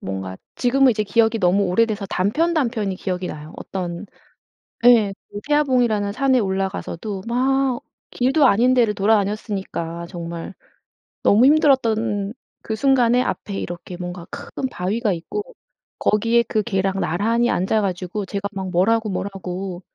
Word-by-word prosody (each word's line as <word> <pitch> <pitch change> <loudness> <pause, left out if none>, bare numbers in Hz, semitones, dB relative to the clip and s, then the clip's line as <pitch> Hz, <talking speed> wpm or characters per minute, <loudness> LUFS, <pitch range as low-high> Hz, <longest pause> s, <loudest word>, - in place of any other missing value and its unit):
뭔가 95 -1 -5 0.2
지금은 265 +1 +4
이제 215 -2 0
기억이 225 +2 +2
너무 195 +1 +3
오래돼서 205 +2 +1
단편 305 - 0
단편이 225 -9 -1
기억이 185 -1 -3
나요. 155 0 -8
어떤 180 +1 -5 0.8
예. 220 -5 +6 0.4
태화봉이라는 245 -9 +2
산에 265 +2 +2
올라가서도 195 -1 -3
막 260 +1 +1 0.3
길도 270 +3 +3
아닌 245 +4 +4
데를 230 -4 +3
돌아다녔으니까 195 -5 -1
정말. 170 0 -6 0.7
너무 225 +5 +5
힘들었던 230 -8 +2 0.3
그 220 - -3
순간에 250 0 +3
앞에 205 -5 -3
이렇게 175 +1 -7
뭔가 175 -1 -6
큰 265 - -5
바위가 205 +4 -1
있고 400 - -4 0.6
거기에 230 +3 +3
그 215 -1 -1
개랑 195 -3 -1
나란히 230 +8 +1
앉아 195 +4 +1
가지고 185 +1 -3
제가 200 +1 -3
막 190 -1 -4
뭐라고 215 +5 +2
뭐라고 185 -1 -5
205 Hz, 315 characters per minute, -21 LUFS, 185-235 Hz, 0.8 s, 예